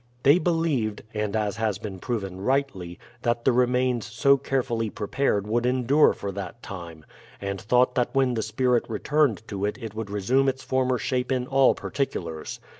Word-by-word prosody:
They 145 +6 +6
believed, 155 -11 0
and 105 -1 -2
as 105 -1 -1
has 110 -4 0
been 100 -2 -7
proved 105 -6 -3
rightly, 95 -4 -2 0.2
that 120 -1 -1
the 130 - +5
remains 125 -1 +1
so 140 -1 +4
carefully 130 -4 -1
prepared 105 -1 -1
would 115 +3 0
endure 130 +4 +4
for 100 - -5
that 100 +4 -7
time, 85 -5 -8 0.3
and 100 -1 -4
thought 125 +4 +3
that 125 -1 +1
when 130 -2 +3
the 115 - -1
spirit 120 +2 +1
returned 120 +1 +1
to 100 -2 -4
it 105 +3 -1
it 115 -4 -7
would 110 -1 -5
resume 125 +7 +2
its 130 0 -4
former 130 0 +1
shape 125 +1 -1
in 125 -1 0
all 135 0 +4
particulars. 85 - -4
120 Hz, 175 wpm, -25 LUFS, 105-130 Hz, 0.3 s, They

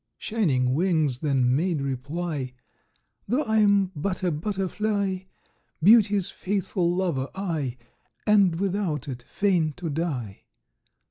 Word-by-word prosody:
Shining 135 - +1
Wings 155 -5 +1
then 130 -4 +2
made 165 +1 0
reply: 140 +1 -3 0.7
"Though 265 +6 +1
I'm 200 -3 +3
but 185 +5 -2
a 180 - +2
butterfly, 195 +2 -1 0.6
Beauty's 205 -2 +5
faithful 185 -2 -1
lover 165 -8 -1
I, 160 -10 -2 0.5
And 195 -6 +4
without 185 -7 -1
it 125 -3 -5
fain 170 0 0
to 170 -2 -5
die. 140 - -3
175 Hz, 110 wpm, -25 LUFS, 145-200 Hz, 0.7 s, Beauty's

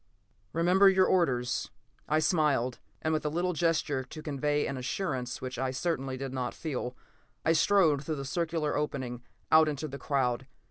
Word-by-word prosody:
"Remember 180 +4 +5
your 190 -1 +4
orders," 125 - +1 0.4
I 155 - +3
smiled, 150 -7 +2 0.2
and 155 - +1
with 155 - 0
a 150 - 0
little 175 +4 0
gesture 155 -4 +1
to 155 +4 -10
convey 145 0 0
an 140 - -3
assurance 130 -2 -3
which 125 -1 -4
I 130 0 0
certainly 135 -2 -2
did 135 0 -5
not 125 -2 -3
feel, 130 -5 -4 0.5
I 160 - +4
strode 160 -4 +4
through 155 +1 -2
the 140 -1 -5
circular 160 0 -1
opening 130 -5 -3 0.3
out 155 0 +7
into 150 +1 -3
the 140 -1 -7
crowd. 130 -2 0
150 Hz, 170 wpm, -30 LUFS, 130-160 Hz, 0.5 s, out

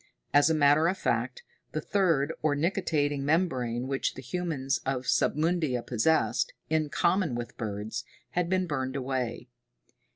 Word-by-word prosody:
As 145 +2 +6
a 160 - +2
matter 150 +2 +5
of 185 +2 0
fact, 485 - -1 0.3
the - - -1
third, 165 -7 +1
or 150 -2 +2
nictitating 145 -4 0
membrane, 130 -6 0
which 135 0 -1
the 130 - -8
humans 140 -2 -2
of 130 -1 -1
Submundia 155 -6 +1
possessed, 125 0 +1 0.2
in 155 -1 +1
common 170 -1 +1
with 120 0 -5
birds, 105 -1 -4 0.3
had 175 -1 0
been 185 0 +1
burned 135 -5 -3
away. 130 -3 -3
145 Hz, 140 wpm, -28 LUFS, 130-165 Hz, 0.3 s, As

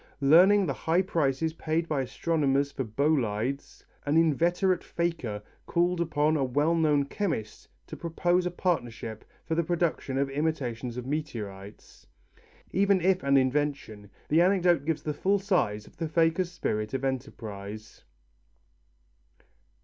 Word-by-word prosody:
Learning 180 +8 +6
the 140 - -1
high 165 +7 +1
prices 160 -3 0
paid 160 +1 -1
by 150 -4 0
astronomers 140 0 0
for 135 - -3
bolides, 130 0 -1 0.2
an 145 +2 +1
inveterate 170 +3 +2
faker 145 -12 -3 0.2
called 175 0 +1
upon 155 -1 +1
a 145 - +1
well 145 +6 +1
known 150 -4 +2
chemist 145 - -4 0.2
to - - -8
propose 175 +2 0
a - - 0
partnership 120 - -3 0.2
for - - -2
the 170 +1 +1
production 165 -5 -1
of 140 0 +1
imitations 130 -5 -2
of 125 - -5
meteorites. 110 -9 -6 0.6
Even 200 0 +3
if 185 +1 +2
an 140 0 +3
invention, 130 -6 -1 0.2
the 160 +3 +4
anecdote 180 -5 +3
gives 160 -1 -1
the 150 - -2
full 195 +7 +1
size 140 - 0
of - - -19
the 165 - -2
faker's 165 +3 +1
spirit 110 -9 -2
of 135 +1 -2
enterprise. 110 -5 -6
150 Hz, 135 wpm, -28 LUFS, 130-170 Hz, 0.6 s, Learning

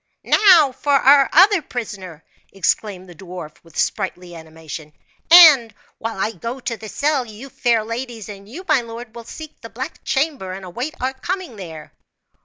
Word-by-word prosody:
"Now 345 -9 +6
for 285 +2 -2
our 275 0 +5
other 380 +3 +5
prisoner!" 195 - -7 0.3
exclaimed 195 0 -2
the 175 - -12
dwarf 175 -3 -10
with 165 -2 -16
sprightly 180 -1 -2
animation; 160 -2 -10 0.4
"and 310 -9 +8 0.3
while 225 -1 -5
I 205 +3 -1
go 230 +6 -6
to 235 -2 -4
the 220 -1 -10
cell, 285 +1 0
you, 230 +4 -11
fair 235 -4 +1
ladies, 230 -1 -6
and 200 -1 -11
you 345 +11 -9
my 305 -6 +3
lord, 230 -1 -9
will 235 -1 -10
seek 310 +5 -11
the 230 - -10
black 260 +8 -7
chamber 270 - -1
and 190 0 -8
await 245 - -5
our 260 +1 -2
coming 355 - -5
there." 165 -6 -10
230 Hz, 170 wpm, -20 LUFS, 190-275 Hz, 0.4 s, and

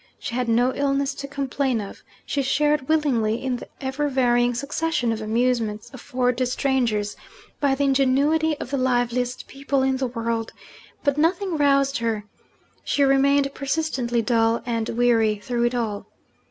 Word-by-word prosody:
She - - -6
had 250 -1 -1
no 245 +3 +3
illness 280 0 0
to 280 0 -7
complain 275 -3 -1
of; 200 -2 -8 0.2
she 280 - -1
shared 295 +1 +1
willingly 260 -9 +2
in 255 +1 -2
the - - -10
ever 270 +2 -2
varying 245 -2 +2
succession 280 -1 -1
of 220 -1 -3
amusements 230 0 -1
offered 250 0 -1
to 255 - +1
strangers 240 -6 0 0.4
by 280 -2 +2
the 285 - -1
ingenuity 280 +4 +2
of 255 - -6
the 280 - 0
liveliest 245 -1 0
people 275 0 -1
in 265 0 +1
the 260 0 -1
world 230 -1 -3 0.5
but 285 0 +1
nothing 355 +3 +1
roused 275 -2 +2
her: 225 -3 -2 0.6
she 285 - +1
remained 275 +1 +3
persistently 270 -5 -1
dull 230 -1 +2
and 230 -2 -2
weary 230 -2 +2
through 235 +3 -2
it 240 +1 0
all. 215 -4 -3
255 Hz, 155 wpm, -23 LUFS, 235-280 Hz, 0.6 s, no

